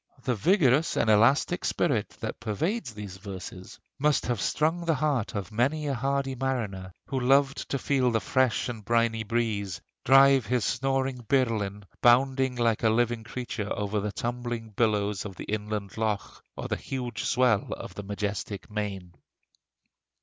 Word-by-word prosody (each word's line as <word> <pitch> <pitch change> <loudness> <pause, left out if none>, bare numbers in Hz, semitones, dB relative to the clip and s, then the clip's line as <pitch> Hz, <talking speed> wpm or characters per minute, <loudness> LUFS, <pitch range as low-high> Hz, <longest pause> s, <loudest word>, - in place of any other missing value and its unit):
The 125 - +1
vigorous 150 - +3
and 110 - +3
elastic 115 +6 +3
spirit - - 0
that - - -4
pervades 120 - -2
these 100 -3 -7
verses 95 -1 -8 0.2
must 150 +1 +2
have 120 -4 -1
strung 160 +3 +1
the 165 -2 +1
heart 140 -6 0
of 100 0 -4
many 135 +8 +1
a 140 - 0
hardy 135 +1 -1
mariner, 115 -8 -3
who 135 - -2
loved 135 +2 +2
to 140 - 0
feel 130 -2 +1
the 115 -1 +1
fresh 130 +4 +1
and 115 -3 -6
briny 115 0 +1
breeze 105 -5 -1 0.2
drive 135 -1 +6
his 125 -3 +1
snoring 135 +1 0
birlinn 110 -7 +1 0.2
bounding 130 +1 +4
like 115 -2 +1
a 110 - +4
living 120 0 +1
creature 115 -3 -5
over 105 +1 -1
the 105 +1 -2
tumbling 120 0 -4
billows 105 -2 +1
of 100 -3 -7
the - - -7
inland 105 -2 -4
loch, 110 -2 -2
or - - -4
the - - -1
huge 125 -4 -4
swell 125 -5 +2
of - - -8
the - - -6
majestic 100 -1 -4
main." 100 -4 -4
115 Hz, 155 wpm, -27 LUFS, 105-135 Hz, 0.2 s, drive